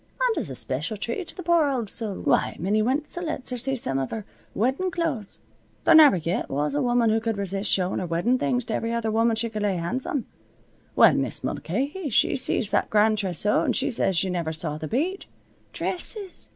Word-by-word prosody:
And - - +1
as - - -4
a 130 - -6
special 130 - -2
treat 235 - -4
to - - -11
the 365 - -7
poor 340 -2 +3
owld 260 -6 -1
soul, 210 -1 -3
why - - +1
Minnie 205 +5 +1
Wenzel 295 +9 -2
lets 295 -5 -3
her 250 - -2
see 270 +3 0
some 135 - -1
av 135 - -2
her 220 -3 -5 0.3
weddin' 265 - 0
clo'es. 315 - -3 0.4
There - - +5
never 300 - +8
yet 170 +2 -2
was 145 +1 -1
a 145 - 0
woman 240 -2 +2
who 220 - +2
cud 225 -1 -2
resist 195 +1 -2
showin' 185 -1 +1
her 180 - -3
weddin' 175 +10 +1
things 245 -3 0
to 220 - -3
every 230 +1 -2
other 230 -1 -1
woman 225 +1 +2
she 230 +1 -1
cud 215 -2 -5
lay 205 -2 +1
hands 200 +10 -2
on. 275 -5 -2 0.7
Well, - - +7
Mis' - - 0
Mulcahy, 280 - -3
she 225 - +2
see 255 - +4
that 215 - 0
grand 215 0 +3
trewsow 195 +1 +1
and - - 0
she 275 +1 0
said 195 -5 +1
she 185 +2 +1
never 170 -3 -2
saw 155 -1 -3
th' 155 - -6
beat. 345 - -2 0.4
Dresses! 380 +1 -4
225 Hz, 215 wpm, -25 LUFS, 190-270 Hz, 0.7 s, never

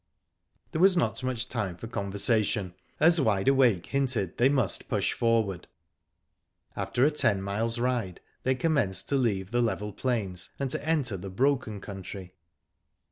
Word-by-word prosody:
There 160 - -1
was 190 -1 +6
not 120 -8 0
much 130 -2 -2
time 105 -9 -3
for 100 - -8
conversation, 100 -2 0 0.3
as 165 +1 +5
Wide 100 -6 +1
Awake 125 -10 +4
hinted 130 -10 -1
they 125 +3 +4
must 135 -8 0
push - - 0
forward. 110 -6 0 1.1
After 125 - +1
a 150 - +3
ten 105 -9 +2
miles* 110 +4 -2
ride, 120 -7 -1 0.2
they 130 0 +1
commenced 125 - +1
to 140 - +1
leave 105 -7 0
the 120 0 +2
level 105 -3 -1
plains 100 -7 -2
and 135 -2 -2
to 140 - -2
enter 145 -10 0
the 95 +2 -7
broken 125 0 0
country. 95 -2 -8
115 Hz, 150 wpm, -28 LUFS, 100-130 Hz, 1.1 s, was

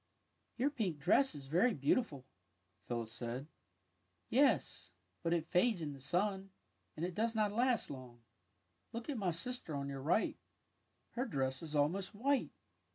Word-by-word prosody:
'' - - -45
'' - - -44
Your 280 +4 +2
pink 205 - -1
dress 180 - +4
is 140 -2 -7
very 180 - +3
beautiful," 140 - +1 0.6
Phyl 120 -1 0
lis 110 -1 -6
said. 120 +2 -3
^' - - -17 0.8
Yes, 255 - +3 0.3
but 165 - 0
it 170 -2 +2
fades 180 +4 +3
in 150 -3 -3
the 135 - -11
sun, 195 +5 0 0.5
and 165 - -1
it 180 - -3
does 225 +4 0
not 210 -2 +2
last 240 - +2
long. 125 -3 -9 0.7
Look 230 +5 -3
at 270 - -3
my 190 -3 +1
sister 170 - -1
on 140 0 -3
your 135 -1 -5
right. 165 +10 +2 0.7
Her 245 +2 -1
dress 130 - -1
is 155 -2 -5
almost 180 +8 +1
white. 275 +6 +2
175 Hz, 170 wpm, -36 LUFS, 140-230 Hz, 0.8 s, dress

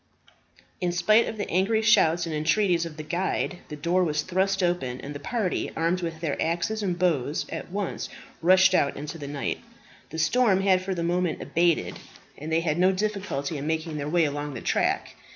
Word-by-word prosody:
In 180 -1 +1
spite 215 +6 +4
of 220 - -5
the 205 - -3
angry 205 +5 +1
shouts 175 -6 +4
and 165 - -4
entreaties 170 +2 +2
of 155 -2 -11
the 155 - -5
guide, 175 +2 -2
the 150 - -7
door 170 +3 +1
thrust 190 +5 0
open, 135 -8 -1
and 145 - -7
the 145 - -7
party, 205 +3 -1
armed 170 +3 0
with 165 -2 -4
their 155 -4 -2
axes 175 +7 -1
and 180 -4 -1
bows, 155 -6 0
at - - -6
once 195 0 -3 0.3
rushed 185 +2 +5
out 140 -6 +2
into 150 +3 -6
the 145 - -6
night. 140 0 -3 0.5
The - - -7
storm 195 +4 +3
had 190 -1 +3
for 190 0 -3
the 170 - -2
moment 175 -1 0
abated 170 -1 +1 0.4
and 155 +3 -7
they 165 +1 +2
had 165 -1 -1
no 185 +1 +5
difficulty 190 -8 -2
in 145 - -4
making 160 0 -2
their 145 0 -3
way 170 0 +3
along 145 -1 -3
the 115 - -6
track. - - 0
170 Hz, 195 wpm, -26 LUFS, 155-185 Hz, 0.5 s, rushed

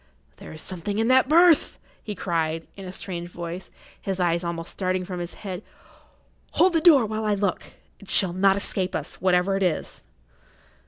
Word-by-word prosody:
"There - - -11
is 155 - -7
something 190 +3 -4
in 225 +2 +1
that 260 +1 +4
berth!" 335 0 +5 0.2
he 210 - -6
cried, 165 -3 -2
in 195 - -9
a 180 - -6
strange 175 -2 -5
voice, 175 +1 -7 0.3
his 190 -1 -3
eyes 170 -1 +1
almost 170 -1 -4
starting 185 -1 -2
from 180 -1 -6
his 175 0 -6
head. 190 -2 -6 0.9
"Hold 370 0 +4
the 325 - +2
door, 300 -9 +6
while 215 +1 -3
I 210 -1 +1
look—it 200 0 -5
shall 185 -4 +4
not 195 +1 +3
escape 190 -2 0
us, 150 - -5
whatever 185 +1 +2
it - - -4
is!" 180 -4 -2
185 Hz, 175 wpm, -24 LUFS, 175-210 Hz, 0.9 s, door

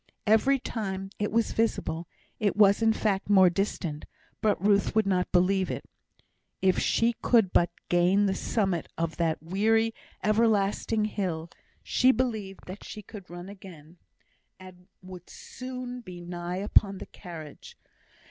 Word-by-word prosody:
Every 225 +6 +4
time 195 -6 -4
it 210 - -1
was 230 0 +1
visible 170 -7 -1 0.3
it 205 -2 +1
was 205 0 +5
in 225 0 +4
fact 205 -3 -1
more 190 -3 +6
distant, 170 -5 -3 0.4
but 210 -2 +2
Ruth 200 +2 +2
would 220 -1 +3
not 185 -2 0
believe 185 +1 +2
it. - - -5 0.7
If 190 -1 +2
she 235 +1 +2
could 225 -7 +3
but 175 - +4 0.2
gain 180 +4 +3
the 195 - +1
summit 190 -5 -1
of 165 -1 -2
that 165 -2 0
weary, 225 +6 +2 0.3
everlasting 215 0 +2
hill, 175 -6 -3 0.3
she 255 +1 +4
believed 220 -7 -2
that 185 +3 -9
she 210 - -8
could 200 -3 -11
run 175 +1 -8
again, 180 -5 -12 0.6
and 185 -1 -14 0.2
would 185 -1 -11
soon 255 -1 -7
be 180 -6 -10
nigh 175 0 -5
upon 200 0 +2
the - - -8
carriage. 160 -5 -11
195 Hz, 145 wpm, -28 LUFS, 180-215 Hz, 0.7 s, more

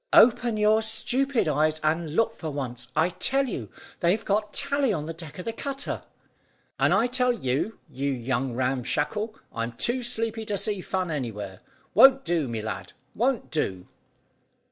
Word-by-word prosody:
"Open 240 -1 +6
your 215 +1 +4
stupid 245 +2 +2
eyes, 155 +1 +2
and 160 0 0
look 225 +1 +2
for 160 - -5
once. 125 -4 -5
I 160 +3 +3
tell 270 +9 +1
you 250 - -5 0.3
they've 185 +6 +2
got 210 +1 0
Tally 280 -3 +1
on 155 -7 -2
the 165 - -5
deck 165 -2 -8
of 180 - -6
the 230 - -2
cutter." 275 +3 -3 0.8
"And - - +4
I 230 - +4
tell 250 0 +2
you, 170 - -1
you 140 +2 -3
young 130 -1 -1
Ram 130 +1 0
Shackle, 210 - -2 0.2
I'm 115 +1 -3
too 240 - 0
sleepy 230 -2 -1
to 205 - 0
see 200 -1 0
fun 185 -2 -2
anywhere. 105 -9 -4 0.3
Won't 270 0 +7
do, 165 -5 +1
my 115 -2 -3
lad 95 -4 -5 0.2
won't 245 +1 0
do." 95 - -1
180 Hz, 165 wpm, -26 LUFS, 135-230 Hz, 0.8 s, Won't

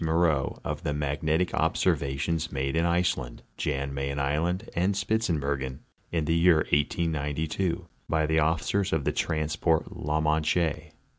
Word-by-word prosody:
Moreaux 80 -3 +1
of - - -3
the 75 - -2
magnetic 75 +4 0
observations 70 +4 0
made 70 +1 -1
in 85 +1 +2
Iceland, 85 -8 0
Jan 70 -1 -2
Mayen 70 0 -2
island, 80 +9 0
and 95 +3 +2
Spitzbergen, 75 - -1 0.3
in 80 -3 0
the 80 - +1
year 85 -1 +4
1892, 80 +3 0 0.2
by 80 -1 +2
the 80 +1 +2
officers 80 +5 +1
of 80 -3 +1
the - - +1
transport 80 +1 0
la 75 +1 -1
Manche. 75 0 +1
80 Hz, 135 wpm, -27 LUFS, 70-85 Hz, 0.3 s, year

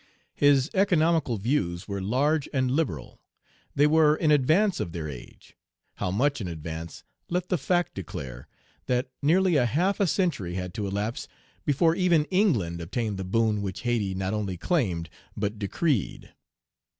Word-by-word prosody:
His 145 0 +3
economical 165 - +2
views 100 -6 -1
were 100 -2 -3
large 140 +9 +1
and 130 -3 0
liberal. 130 - -2 0.5
They 145 - +5
were 155 0 +5
in 155 -1 +1
advance 165 +8 +3
of 85 - -3
their 80 -3 -4
age; 65 -5 -11 0.4
how - - -2
much 130 +8 +1
in 95 - -3
advance 80 0 -7 0.3
let 180 +1 -2
the 180 - +2
fact 175 +6 0
declare, 65 -9 -7 0.4
that 125 +1 0
nearly 175 +3 +3
a 125 -3 +3
half 180 - +1
a 200 - +3
century 145 - -1
had 90 -1 -4
to 105 -2 -3
elapse 105 +4 -3 0.4
before 160 +3 +3
even 170 -4 +3
England 115 - +1
obtained 105 +4 -3
the - - -2
boon 105 +2 +1
which 95 -2 -4
Hayti 110 -6 -1
not 95 +1 -2
only 100 -4 -2
claimed 90 - 0 0.3
but 105 +1 -2
decreed. 115 - -1
120 Hz, 155 wpm, -26 LUFS, 95-160 Hz, 0.5 s, They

